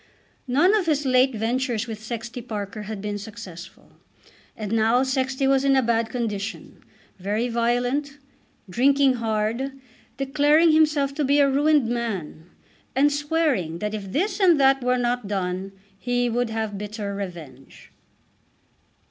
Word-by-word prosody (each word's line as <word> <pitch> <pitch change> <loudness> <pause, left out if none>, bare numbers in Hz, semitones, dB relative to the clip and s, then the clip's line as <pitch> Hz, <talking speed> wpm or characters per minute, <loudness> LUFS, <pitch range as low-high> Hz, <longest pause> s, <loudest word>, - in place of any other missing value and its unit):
None 295 +11 +4
of 395 -5 0
his 295 -2 +1
late 255 0 +3
ventures 240 +1 -1
with 220 -3 -7
Sexty 235 +2 -6
Parker 215 -3 -6
had 210 -2 -6
been 205 0 -3
successful. 195 -5 -11 0.7
And 215 -2 -5
now 225 +3 +3
Sexty 265 0 -1
was 270 0 +3
in 275 -1 +3
a 265 - +3
bad 230 -1 +1
condition, 225 -3 -5 0.4
very 210 +6 -1
violent, 245 +5 0 0.5
drinking 265 +5 +3
hard, 225 +4 -1 0.4
declaring 295 +4 +3
himself 300 -3 +3
to 300 +1 -1
be 280 +1 +3
a 285 -1 +5
ruined 290 0 +3
man, 200 -9 -4 0.5
and 285 +2 +3
swearing 290 - 0
that 210 +4 -3
if 200 -3 -6
this 380 - -1
and 350 -6 +5
that 270 0 +4
were 250 0 +2
not 245 -2 -1
done 190 -1 -3 0.3
he 245 0 0
would 245 0 0
have 220 -3 -3
bitter 210 -1 -5
revenge. 170 -9 -9
240 Hz, 140 wpm, -24 LUFS, 210-275 Hz, 0.7 s, a